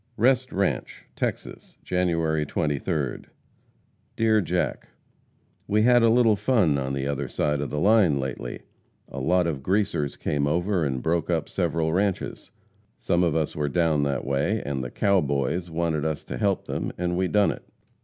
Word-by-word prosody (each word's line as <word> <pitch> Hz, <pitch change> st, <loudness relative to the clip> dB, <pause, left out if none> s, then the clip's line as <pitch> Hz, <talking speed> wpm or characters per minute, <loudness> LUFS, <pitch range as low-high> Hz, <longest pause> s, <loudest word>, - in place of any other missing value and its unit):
REST 130 Hz, +2 st, +2 dB
RANCHE, 100 Hz, 0 st, -2 dB
TEXAS, -, -, -5 dB
January 85 Hz, -4 st, 0 dB
23d. 75 Hz, 0 st, -2 dB, 0.9 s
DEAR 110 Hz, -1 st, +3 dB
JACK: 90 Hz, -1 st, -2 dB, 0.8 s
We 105 Hz, +1 st, +2 dB
had 120 Hz, +1 st, +5 dB
a 115 Hz, -, +5 dB
little 115 Hz, -2 st, +4 dB
fun 100 Hz, -, +2 dB
on 65 Hz, 0 st, -3 dB
the 70 Hz, 0 st, -2 dB
other 70 Hz, -1 st, -2 dB
side 75 Hz, -1 st, -1 dB
of 70 Hz, -, -3 dB
the 75 Hz, -, -4 dB
line 100 Hz, -7 st, +4 dB
lately. 65 Hz, -2 st, -5 dB, 0.5 s
A -, -, -6 dB
lot 90 Hz, 0 st, +2 dB
of 75 Hz, -5 st, -2 dB
Greasers 95 Hz, -4 st, 0 dB
came 70 Hz, -1 st, -1 dB
over 90 Hz, +3 st, 0 dB
and 65 Hz, -4 st, -2 dB
broke 85 Hz, +1 st, 0 dB
up 80 Hz, -3 st, 0 dB
several 80 Hz, -1 st, -1 dB
ranches. 95 Hz, +1 st, -1 dB, 0.5 s
Some 85 Hz, -, 0 dB
of 85 Hz, -3 st, +1 dB
us 80 Hz, -2 st, -1 dB
were 75 Hz, -1 st, -1 dB
down 80 Hz, -1 st, +2 dB
that 70 Hz, -1 st, -1 dB
way, 70 Hz, +11 st, 0 dB
and 70 Hz, -2 st, -2 dB
"the 60 Hz, -, -5 dB
cow 100 Hz, +6 st, +2 dB
boys" 70 Hz, +5 st, -1 dB
wanted 80 Hz, -2 st, -1 dB
us 80 Hz, -1 st, -2 dB
to 60 Hz, -, -6 dB
help 100 Hz, -2 st, 0 dB
them -, -, -3 dB
and 90 Hz, 0 st, -1 dB
we 95 Hz, +1 st, +1 dB
done 105 Hz, +1 st, +3 dB
it. -, -, -8 dB
85 Hz, 170 wpm, -25 LUFS, 70-100 Hz, 0.9 s, had